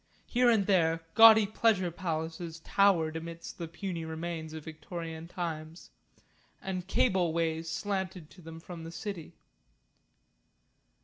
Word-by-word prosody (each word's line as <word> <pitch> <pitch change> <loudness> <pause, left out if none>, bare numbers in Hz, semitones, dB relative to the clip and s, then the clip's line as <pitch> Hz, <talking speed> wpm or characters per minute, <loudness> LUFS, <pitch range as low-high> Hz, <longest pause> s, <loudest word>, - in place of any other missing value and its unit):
Here 245 0 +3
and 220 -4 +3
there 165 -4 +2
gaudy 220 -1 +9
pleasure 200 -4 +2
palaces 165 -1 -4
towered 170 -5 +3
amidst 165 +2 -7
the 170 - -4
puny 175 0 -5
remains 160 0 -5
of 160 -1 -7
Victorian 165 +1 -7
times, 165 -2 -6 0.7
and 185 -1 -4
cable 190 -6 +2
ways 165 0 -1
slanted 185 -2 -3
to 185 - -15
them 165 0 -9
from 165 0 -9
the 165 - -7
city. 180 -2 -6
170 Hz, 125 wpm, -30 LUFS, 160-190 Hz, 0.7 s, gaudy